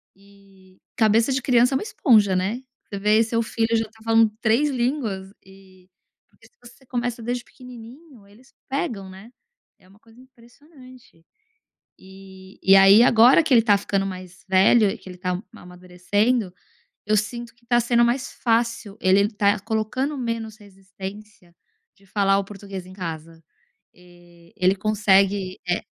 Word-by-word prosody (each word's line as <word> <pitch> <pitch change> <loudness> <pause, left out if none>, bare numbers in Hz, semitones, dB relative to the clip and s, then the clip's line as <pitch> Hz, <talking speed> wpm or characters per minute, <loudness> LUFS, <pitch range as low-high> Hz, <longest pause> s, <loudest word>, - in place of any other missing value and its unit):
E 195 -1 -23 0.2
cabeça 225 +3 +2
de 265 0 -1
criança 250 +1 +2
é - - +3
uma - - -5
esponja, 215 - +2
né? 195 +7 -2 0.2
Você 200 - -7
vê 210 +2 +3
seu 230 +1 -1
filho 225 +1 -1
já 225 - -1
tá 220 +1 -20
falando 225 -1 +3
3 240 +7 +2
línguas 240 -7 -3
e 190 -1 -20 0.4
porque - - -25
se - - -35
você 240 +3 -17
começa 240 -1 -4
desde 245 +1 -3
pequenininho 250 0 -15
eles 240 +7 -22 0.2
pegam, 245 - -4
né? 195 +5 -14 0.5
É 185 - -24
uma 195 +2 -22
coisa 225 +2 -22
impressionante. 255 - -19 0.8
Eh, 190 0 -15
e 190 - +5
aí 195 +3 +7
agora 245 +5 +6
que 290 - +2
ele 230 - +5
tá 205 -3 +3
ficando 195 -1 -2
mais 185 -2 -10
velho 195 +3 +4
e - - -7
que - - -14
ele 180 -1 -11
tá 180 0 -3
ma - - -15
amadurecendo, 180 +5 -2 0.5
eu 215 +1 +2
sinto 235 +3 -4
que 235 0 -31
tá 240 0 +2
sendo 235 0 +2
mais 250 +3 -1
fácil 230 -3 -1
ele 190 +2 +3
tá 205 -1 +1
colocando 225 +7 -3
menos 230 -3 -4
resistência 195 -1 -12 0.4
de 195 - -25
falar 195 0 +1
o 200 - -2
português 195 -2 -9
em 185 - -13
casa. 165 -3 -8 0.5
Eh, 175 -1 -21
ele 185 +1 +2
consegue 195 -2 +1
é 175 - -1
210 Hz, 160 wpm, -22 LUFS, 190-235 Hz, 0.8 s, aí